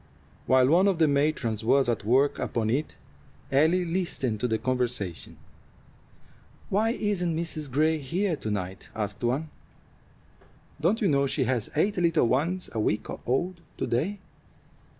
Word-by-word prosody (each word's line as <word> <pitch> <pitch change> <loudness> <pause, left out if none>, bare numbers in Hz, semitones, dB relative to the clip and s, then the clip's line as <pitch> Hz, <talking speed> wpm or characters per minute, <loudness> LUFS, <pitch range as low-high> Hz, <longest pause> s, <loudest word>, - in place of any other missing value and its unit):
While 130 +1 +5
one 180 +5 +5
of 195 -3 +2
the 160 -1 +4
matrons 140 -7 0
was 135 +3 +3
at 115 -3 -1
work 135 +6 +2
upon 110 -2 -1
it, 145 +6 -1 0.6
Ellie 160 +6 +3
listened 165 - -2
to 125 - 0
the 110 -2 0
conversation. 125 -8 -3 1.3
"Why 215 +3 +2
isn't 190 -7 0
Mrs. 160 -3 -4
Gray 155 +4 +2
here 170 +6 -1
to 110 - -5
night?" 95 -2 -4
asked 105 0 -4
one. 135 +6 -1 1.3
"Don't 195 +9 +2
you 205 - +3
know 140 -3 +2
she 135 +1 0
has 120 -3 0
eight 195 +7 +1
little 165 -7 +3
ones 165 +9 0
a 115 - -2
week 105 0 -1 0.2
old 175 +7 -1 0.2
to - - -1
day?" 160 - -1
140 Hz, 150 wpm, -27 LUFS, 120-170 Hz, 1.3 s, While